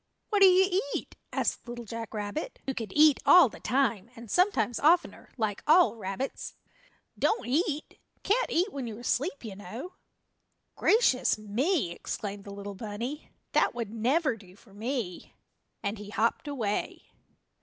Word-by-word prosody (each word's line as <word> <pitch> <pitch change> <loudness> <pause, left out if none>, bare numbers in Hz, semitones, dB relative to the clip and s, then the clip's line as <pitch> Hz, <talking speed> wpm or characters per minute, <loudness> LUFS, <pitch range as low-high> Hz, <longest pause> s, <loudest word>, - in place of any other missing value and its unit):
"What 410 -1 +2
do 390 - +10
you 375 +1 +4
eat?" - - -5 0.2
asked - - -1
Little 240 0 -7
Jack 225 +1 -6
Rabbit, 210 - -4
who 270 - -1
could 225 -6 -5
eat 300 -1 +6
all 360 -8 +8
the - - -12
time, 235 -4 0
and 230 -2 -10
sometimes 360 - +2
oftener, 340 +4 +2
like 215 -4 -1
all 335 -2 +6
rabbits. 205 +5 -5 0.6
"Don't 440 - +1
eat 300 +3 -1 0.2
can't 475 +5 +1
eat 370 +5 +1
when 270 -4 -4
you're 225 +1 -7
asleep, 280 +2 -1
you 205 -3 -6
know." 220 - -8 0.8
"Gracious 420 - +3
me!" 215 - 0
exclaimed 200 +3 -5
the 200 - -8
little 200 0 -7
bunny, 230 +8 -6 0.2
"that - - +2
would 230 -3 -4
never 260 +4 +1
do 190 -4 -16
for 200 0 -20
me!" 220 -4 -4 0.5
and 200 +1 -2
he 205 -1 -9
hopped 220 +7 0
away. 225 -8 -3
240 Hz, 155 wpm, -29 LUFS, 210-310 Hz, 0.8 s, do